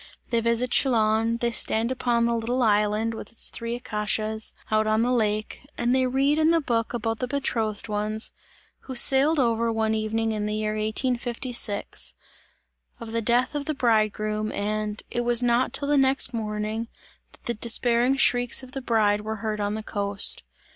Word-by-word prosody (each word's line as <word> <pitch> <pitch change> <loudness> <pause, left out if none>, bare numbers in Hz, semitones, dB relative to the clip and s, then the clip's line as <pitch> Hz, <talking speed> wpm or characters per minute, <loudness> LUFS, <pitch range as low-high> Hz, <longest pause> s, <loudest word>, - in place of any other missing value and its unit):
They 235 - +2
visit 235 +2 0
Chillon, 225 -3 +2
they 235 0 -1
stand 230 +1 +2
upon 240 -2 0
the 235 - +1
little 235 +2 -1
island, 210 +1 +1
with 225 - -9
its 230 - +1
three 230 0 -4
acacias 215 -2 -2 0.2
out 215 0 +2
on 215 +1 +2
the 245 - +1
lake 215 -3 -1 0.2
and 240 +1 +1
they 260 0 +2
read 275 +4 +1
in 315 0 +3
the 335 0 +3
book 235 -5 -1
about 225 -1 -2
the 250 - -2
betrothed 230 -7 -2
ones, 215 +1 +1 0.5
who 260 - -7
sailed 275 +5 +4
over 230 -2 +1
one 220 -1 0
evening 220 +1 -1
in 210 -1 -2
the 210 - -2
year 215 0 -1
1856; 235 0 -1 0.8
of 230 -2 -8
the 230 0 -1
death 245 +4 +1
of 290 -1 -3
the 310 - -2
bridegroom, 215 -3 0
and: 210 +1 -3
"it 240 - -1
was 240 0 +2
not 240 +1 +2
till 285 - -1
the 290 0 +2
next 265 -1 +3
morning, 215 0 -3 0.5
that - - -15
the 240 - -2
despairing 235 +3 +2
shrieks 245 -1 +2
of 255 - -12
the 270 0 -5
bride 215 -4 +1
were 220 +1 -4
heard 215 0 -4
on 205 +1 -1
the 220 - -5
coast!" 200 -1 -1
230 Hz, 180 wpm, -25 LUFS, 215-245 Hz, 0.8 s, sailed